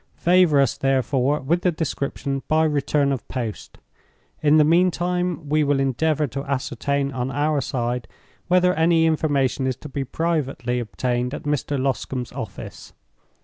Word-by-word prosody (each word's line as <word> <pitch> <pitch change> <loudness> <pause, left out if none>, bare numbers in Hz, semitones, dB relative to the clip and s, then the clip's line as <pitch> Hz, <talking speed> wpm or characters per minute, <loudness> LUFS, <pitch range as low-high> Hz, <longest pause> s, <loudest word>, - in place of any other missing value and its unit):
Favor 175 -4 +4
us, 135 -4 +2
therefore, 135 +1 +1
with 165 +7 0
the 180 - +2
description 140 -3 -3
by 155 +1 +3
return 145 -2 +1
of 135 -4 -4
post. 115 -5 -5 0.6
In 150 0 +5
the 155 - +6
meantime, 175 0 +1
we 155 +1 +2
will 145 -1 +1
endeavor 150 +3 +1
to 140 -1 -5
ascertain 140 +1 -1
on 130 -1 -3
our 145 +2 0
side 125 -2 -2 0.4
whether 180 0 +4
any 165 0 +3
information 140 -5 +1
is 130 - -1
to 150 +4 -11
be 135 0 -3
privately 135 -4 -1
obtained 125 +3 -2
at - - -8
Mr. 145 -1 -1
Loscombe's 130 -2 -2
office. 125 -6 -8
140 Hz, 145 wpm, -23 LUFS, 130-160 Hz, 0.6 s, the